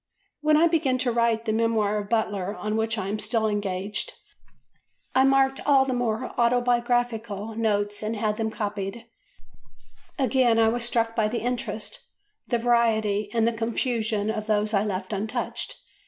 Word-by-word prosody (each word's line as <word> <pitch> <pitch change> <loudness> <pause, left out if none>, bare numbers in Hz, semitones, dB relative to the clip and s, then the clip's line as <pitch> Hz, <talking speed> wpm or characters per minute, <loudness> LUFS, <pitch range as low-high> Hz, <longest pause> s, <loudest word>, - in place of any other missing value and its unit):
When 305 0 +3
I 325 - +5
began 290 -6 +1
to 255 -1 0
write 230 -1 +1
the 220 - 0
Memoir 220 -2 +1
of 205 -1 -7
Butler 205 -3 -1
on 215 0 -3
which 225 +1 0
I 190 - -3
am 210 +2 -2
still 225 -1 +1
engaged, 205 - -3 1.0
I 260 0 +5
marked 270 0 +3
all 275 -2 +4
the 260 - -1
more 245 -1 -2
autobiographical 240 -3 +1
notes 205 -2 0
and 215 +1 -2
had 210 -1 -1
them 220 -1 -1
copied; 205 0 -4 1.1
again 255 -3 +3
I 225 -1 +5
was 240 +1 -1
struck 230 -1 0
by 220 -2 +2
the 230 +2 -3
interest, 250 - -3 0.5
the 240 - +1
variety, 220 -3 +2
and 230 0 +2
the 235 - +1
confusion 225 -2 -1
of 215 -1 -4
those 215 0 +1
I 200 -1 +3
left 190 -1 -3
untouched. 210 +2 -3
225 Hz, 160 wpm, -25 LUFS, 210-240 Hz, 1.1 s, I